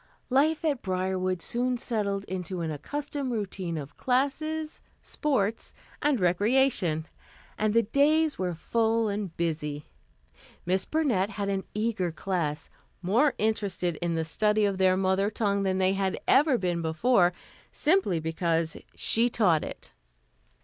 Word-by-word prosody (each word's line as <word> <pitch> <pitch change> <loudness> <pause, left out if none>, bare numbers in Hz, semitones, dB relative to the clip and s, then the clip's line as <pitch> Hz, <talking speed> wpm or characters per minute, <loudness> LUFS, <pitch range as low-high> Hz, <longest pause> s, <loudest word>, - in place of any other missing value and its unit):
Life 305 +5 +2
at 285 -5 0
Briarwood 185 -1 -1
soon 250 +1 0
settled 205 -4 -2
into 185 -2 -4
an 160 -1 -2
accustomed 280 - -4
routine 190 -6 -3
of 145 -2 -8
classes, 305 +5 -1 0.2
sports 225 -8 -2 0.3
and 290 -4 +2
recreation, 180 - +2 0.5
and 215 0 0
the 230 - +5
days 295 +7 +2
were 180 -2 -1
full 225 +5 +1
and 200 -4 -4
busy. 150 -3 -2 0.8
Miss 185 +2 +1
Burnett 250 -12 +1
had 200 -1 -3
an 195 -1 -2
eager 210 -5 -1
class, 160 -3 -3 0.4
more 235 +11 +3
interested 200 -6 -1
in 170 -1 -2
the 160 0 -1
study 210 +6 +2
of 195 -2 -1
their 185 0 +4
mother 190 +1 +1
tongue 205 -2 0
than 190 -1 0
they 190 0 +2
had 195 -1 -1
ever 280 -2 +5
been 175 -3 -1
before, 175 +4 +3 0.4
simply 310 - +2
because 165 0 -1 0.2
she 235 +2 +3
taught 180 -10 +2
it. - - -8
200 Hz, 135 wpm, -27 LUFS, 180-245 Hz, 0.8 s, the